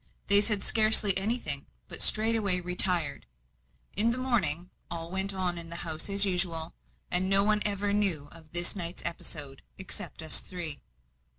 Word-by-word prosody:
They 200 0 +8
said 210 -1 +1
scarcely 215 -3 +5
anything, 195 - -2 0.2
but - - -8
straightway 215 -4 +3
retired. 180 -4 +2 0.7
In 220 +4 +4
the 235 - -2
morning, 185 - +1 0.2
all 165 0 -7
went 190 +1 0
on 180 -2 -3
in 165 0 -3
the 170 - -7
house 160 +2 -5
as 200 0 +1
usual, 175 -4 -1 0.4
and 185 +1 +1
no 195 0 +4
one 210 0 0
ever 200 0 -2
knew 190 -9 +1
of 160 -2 -17
this 175 +2 +3
night's 175 -2 -6
episode, 150 -5 -5 0.2
except 190 -3 -6
us 160 - +1
three. 165 -6 -5
185 Hz, 160 wpm, -27 LUFS, 165-205 Hz, 0.7 s, They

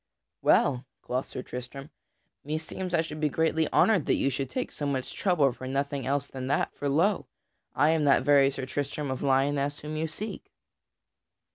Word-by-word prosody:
"Well," 130 -2 +3 0.2
quoth 125 +2 -2
Sir 125 - -6
Tristram, 135 +4 -8 0.5
"meseems 160 +4 -3
I 160 - +3
should 155 -1 -6
be 150 -1 +1
greatly 160 +1 +1
honored 210 -9 +4
that - - +3
you 135 - +1
should 135 0 -3
take 255 - -3
so 145 - -3
much 135 -2 -2
trouble 160 -8 +2
for 130 +1 -8
nothing 140 0 -2
else 140 +1 0
than 130 -2 -6
that; 140 - 0
for 145 - -3
lo! 175 +8 +2 0.5
I 150 +4 +4
am 160 -2 +2
that 140 - +4
very 140 -1 +5
Sir 135 -1 -4
Tristram 145 +1 -3
of 130 - -4
Lyonesse 140 +1 +1
whom 150 +1 -5
you 160 +1 -1
seek." 205 +8 -7
145 Hz, 180 wpm, -28 LUFS, 135-155 Hz, 0.5 s, very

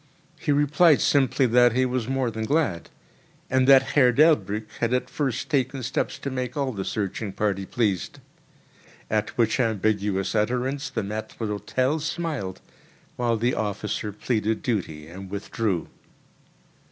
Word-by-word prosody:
He - - -1
replied 150 +2 +4
simply 135 -1 +3
that 120 0 +5
he 130 +1 +2
was 125 -2 -2
more 130 -2 0
than 110 0 -3
glad, 140 - 0 0.6
and 130 0 +3
that 135 -1 +8
Herr 130 -4 +5
DelbrĂĽck 110 - +3
had 120 +1 +1
at 125 - 0
the - - -22
first 135 -6 -1
taken 135 -3 0
steps 120 - -2
to 140 - -5
make 130 +1 -4
all 140 -2 0
the 100 -5 -4
searching 100 +1 -3
party 100 -1 -1
pleased; 105 -7 -1 0.9
at 105 -1 -1
which 115 +1 +2
ambiguous 105 -4 0
utterance 125 +6 0
the 110 - -3
maître 105 +2 -6
d'hĂ´tel 120 +7 -1
smiled, 155 - -3 0.5
while 120 -2 0
the 120 +3 +1
officer 105 0 -3
pleaded 110 +1 -1
duty 90 - -2
and 95 +3 -9
withdrew. 100 -2 -2
120 Hz, 145 wpm, -25 LUFS, 105-130 Hz, 0.9 s, that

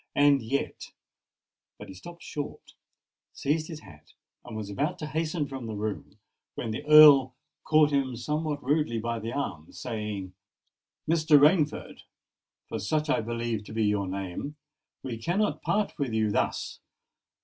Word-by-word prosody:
"And 145 -1 +5
yet——" 130 +5 -3 0.9
But - - -10
he - - -8
stopped 170 - -11
short, 145 -1 -7 0.6
seized 155 +2 -1
his 160 -3 -8
hat, 90 -7 -16 0.3
and 110 - -8
was 105 -2 -5
about 145 - -2
to 155 - -5
hasten 155 0 -2
from 135 -4 -6
the 110 - -4
room, 105 0 -5 0.4
when 110 - -3
the 110 - -4
Earl 145 -4 +8 0.3
caught 155 -1 +4
him 135 -3 0
somewhat 150 +5 -2
rudely 145 -3 +1
by 115 +1 -2
the 115 +2 -5
arm, 85 - -4
saying,—"Mr. 110 - -2
Rainford—for 150 -6 -1
such 150 +9 0
I - - +2
believe 115 -1 -3
to - - -9
be 110 0 0
your 105 -2 +1
name—we 120 +6 -7
cannot 190 - 0
part 210 0 0
with 135 -5 -1
you 110 -1 +1
thus! - - -1
135 Hz, 140 wpm, -28 LUFS, 110-150 Hz, 0.9 s, Earl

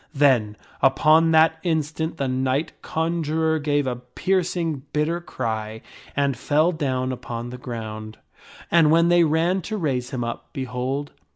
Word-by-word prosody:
Then, 125 -7 +3 0.2
upon 155 +5 +5
that 160 0 +4
instant, 160 -1 -1
the 140 - -1
knight 130 +4 0
conjurer 160 -1 0
gave 145 -1 +1
a 125 -2 -2
piercing 165 +4 -1
bitter 160 +3 0
cry 110 -7 -4 0.3
and 140 -1 +1
fell 150 +7 +2
down 130 -5 -1
upon 120 -1 -6
the 125 - -8
ground; 110 -3 -6 0.5
and 165 -3 +5
when 165 +2 +4
they 175 0 +5
ran 165 +4 +2
to 215 +5 -4
raise 130 -8 -1
him 125 -3 -3
up, 115 0 -5
behold 130 +1 -3
145 Hz, 145 wpm, -23 LUFS, 125-160 Hz, 0.5 s, upon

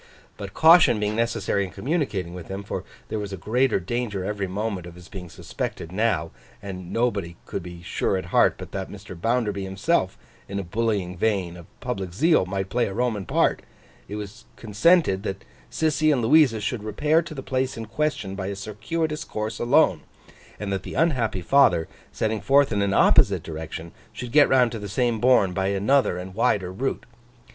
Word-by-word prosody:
But, 100 -1 -8
caution 160 -8 +6
being 105 0 -1
necessary 115 -3 0
in 95 - -5
communicating 110 - -2
with 90 -2 -8
him—for 100 +1 -5 0.3
there 110 - -2
was 100 -1 -5
a 95 - -5
greater 125 +6 +1
danger 100 0 -3
every 100 -1 -2
moment 100 -2 -3
of 85 - -11
his 90 -1 -13
being 90 -2 -8
suspected 80 - -6
now, 95 -6 0 0.3
and 95 -3 -8
nobody 100 -8 -1
could 100 - -4
be 85 0 -10
sure 95 +2 -1
at 90 -1 -7
heart - - +5
but - - -9
that 95 -1 -4
Mr. 100 -2 -10
Bounderby 105 +1 -1
himself, 95 - 0 0.3
in 100 - -4
a 100 - -2
bullying 100 -1 -1
vein 95 -4 0
of 85 -1 -12
public 95 -8 -4
zeal, 155 - +3
might 95 0 -3
play 120 0 +1
a 95 - -6
Roman 115 -5 -1
part—it 105 - -2
was 105 +3 -8
consented 110 - +3
that 95 -2 -5 0.3
Sissy 155 -1 +2
and 130 -5 +1
Louisa 130 -2 +5
should 105 +1 -3
repair 150 +9 +2
to 165 -1 -9
the 135 - -6
place 130 -1 -1
in 115 - -5
question, 115 -4 -2
by 95 -1 -4
a 100 - -3
circuitous 150 +11 -3
course, 110 -3 -4
alone; 120 - +3 0.6
and 100 -2 -3
that 95 - -2
the - - -8
unhappy 130 - +1
father, 135 -8 +4 0.2
setting 110 -1 -1
forth 140 -1 +4
in 100 -2 +1
an 100 -1 +1
opposite - - +4
direction, 80 +1 -7 0.2
should 125 -1 -7
get 145 +1 +6
round 125 -3 +4
to 115 - -5
the 105 -1 -6
same 120 +1 0
bourne 115 -6 +4
by 95 +1 0
another 100 +2 +2
and 90 +1 -7
wider 100 -4 +1
route. 135 +8 -3
105 Hz, 185 wpm, -24 LUFS, 95-125 Hz, 0.6 s, caution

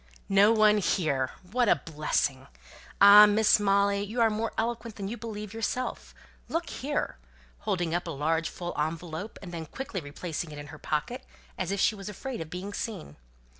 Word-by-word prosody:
"No 200 +2 +6
one 215 -1 +5
here? 145 -9 0 0.2
What 245 -1 +2
a - - +6
blessing! 145 -4 -2 0.5
Ah, 205 +1 +10
Miss 210 +1 +4
Molly, 200 0 +2
you 215 +4 -4
are 225 -1 +4
more 220 +1 -2
eloquent 230 -1 -2
than 195 -2 -5
you 220 - -4
believe 210 -2 -7
yourself. 225 +3 -3 0.3
Look 335 +1 -2
here!" 285 - -3 0.4
holding 175 - -1
up 175 0 -1
a - - -3
large 160 +2 0
full 175 -1 -6
envelope, 165 +6 -4
and 180 - -8
then 165 -2 -6
quickly 265 - -5
replacing 160 +3 -5
it 150 - -8
in 145 0 -8
her 155 - -10
pocket, 240 - -3 0.3
as 185 - -3
if 200 0 -1
she 220 - +3
was 200 -1 -7
afraid 235 +3 -6
of 160 - -6
being 185 +4 -6
seen. 195 - -5
200 Hz, 180 wpm, -28 LUFS, 165-220 Hz, 0.5 s, Ah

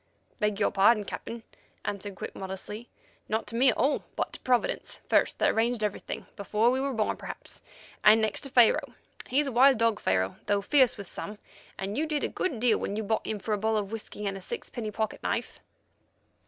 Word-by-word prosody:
"Beg 210 -1 0
your 205 - +2
pardon, 210 +2 +5
Captain," 230 +3 -6 0.4
answered 200 -1 -4
Quick - - -6
modestly; 195 +4 -6 0.4
"not 220 +1 0
to 230 - -6
me 260 +3 +5
at 230 - +1
all, 285 - +2
but - - -2
to - - -7
Providence 250 -2 0
first - - +3
that - - +3
arranged 230 0 +1
everything, 210 -2 -3
before 210 +4 +2
we 260 +1 0
were 275 0 0
born 215 -1 +1
perhaps, - - -9 0.4
and 215 +1 +8
next 220 -2 0
to 275 - -8
Pharaoh. 250 +1 +4 0.3
He's 285 +4 +2
a 275 - -2
wise 260 +3 +6
dog, 230 -2 +2
Pharaoh, 95 0 0
though 200 -1 +2
fierce 260 0 +4
with 200 - -7
some, 210 +4 -7 0.4
and 195 +6 -3
you 315 - 0
did 300 -1 -1
a - - +2
good 290 -11 -2
deal 235 -2 +3
when 200 - -3
you 220 - -2
bought 220 +2 -1
him 215 - -1
for 210 +2 -3
a 210 - 0
bottle 220 +1 +1
of 205 -1 -2
whisky 210 -1 -6
and 195 -1 -1
a 195 - -7
sixpenny 220 +4 -5
pocket 220 +1 -3
knife." - - -2
220 Hz, 210 wpm, -28 LUFS, 205-245 Hz, 0.4 s, and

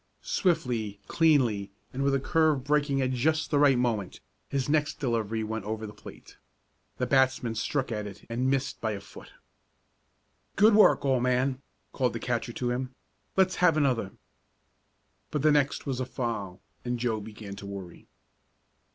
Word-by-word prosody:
Swiftly, 125 - 0
cleanly, 125 -12 +2 0.2
and 130 - -3
with 140 0 +2
the 135 - +2
curve 155 -1 +2
breaking 145 -1 +1
at 130 - 0
just 155 +6 0
the 145 - +3
right 140 -3 +5
moment, 110 -6 -1 0.3
his 135 -2 -1
next 150 0 +1
delivery 115 -4 -1
went 110 -1 -4
over 110 +1 -4
the 105 - -8
plate. - - -13 0.6
The 125 - 0
batsman 130 -2 +2
struck 130 +4 -2
at 105 -2 -3
it 100 0 -11
and 125 +3 -1
missed 135 -1 -1
by 110 -2 -1
a 100 - -5
foot. 100 - -13 1.2
"Good 215 +2 +6
work, 210 -8 +5
old 130 -3 +2
man!" 125 +1 +1 0.3
called 125 -2 0
the - - -4
catcher 120 -1 -2
to 120 +1 -2
him. 125 +1 -3 0.4
"Let's 190 0 +3
have 170 -3 +4
another." 125 -9 +1 1.2
But 150 -2 -2
the 155 - +5
next 145 -1 +1
was 135 -3 -2
a 130 - -1
foul, 105 -8 -4 0.2
and 120 0 -2
Joe 115 -3 -1
began 105 -1 -9
to 100 - -8
worry. 95 -3 -9
125 Hz, 165 wpm, -28 LUFS, 110-145 Hz, 1.2 s, Good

